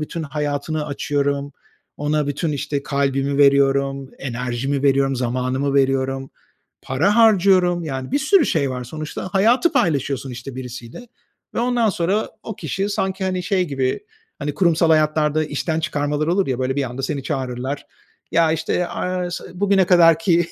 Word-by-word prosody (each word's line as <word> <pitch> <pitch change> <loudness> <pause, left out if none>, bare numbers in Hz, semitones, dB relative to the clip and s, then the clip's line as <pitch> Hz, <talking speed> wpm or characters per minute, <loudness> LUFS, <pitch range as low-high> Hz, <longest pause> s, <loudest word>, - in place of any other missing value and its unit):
bütün 160 +2 -4
hayatını 150 +1 -3
açıyorum, 140 0 -1 0.4
ona 150 0 0
bütün, 150 +2 -2
işte, 140 0 -3
kalbimi 140 0 0
veriyorum, 140 -1 +3
enerjimi 125 +2 -3
veriyorum, 135 -1 +2
zamanımı 130 +3 -1
veriyorum, 135 0 +1 0.5
para 180 - +1
harcıyorum, 185 -6 +4
yani, 130 -3 -5
bir 285 - +3
sürü 305 +3 +4
şey 140 -4 +1
var. 125 -1 -4
Sonuçta, 155 +7 -6
hayatı 230 - +3
paylaşıyorsun, 140 -4 0
işte, 125 +1 -8
birisiyle 125 - -8 0.5
ve - - 0
ondan 240 -2 +2
sonra 190 +5 0
o 220 - -7
kişi 195 +1 -2
sanki, 190 -1 -2
hani, 185 -1 -1
şey 185 -1 +1
gibi, 135 -4 -1 0.4
hani, 145 0 -3
kurumsal 170 -3 +3
hayatlarda 155 0 +2
işten 155 +2 -2
çıkarmalar 145 0 -1
olur 185 +3 +1
ya. 130 -2 -1
Böyle, 130 +1 -1
bir 140 - +1
anda 130 +2 -6
seni 135 0 -2
çağırırlar, 130 0 -4 0.5
"Ya, 165 -1 +4
işte, 170 +2 -1
aaa, 180 -1 -3
s - - -5 0.2
bugüne 195 -2 +3
kadarki 170 -1 +4
145 Hz, 150 wpm, -21 LUFS, 135-175 Hz, 0.5 s, harcıyorum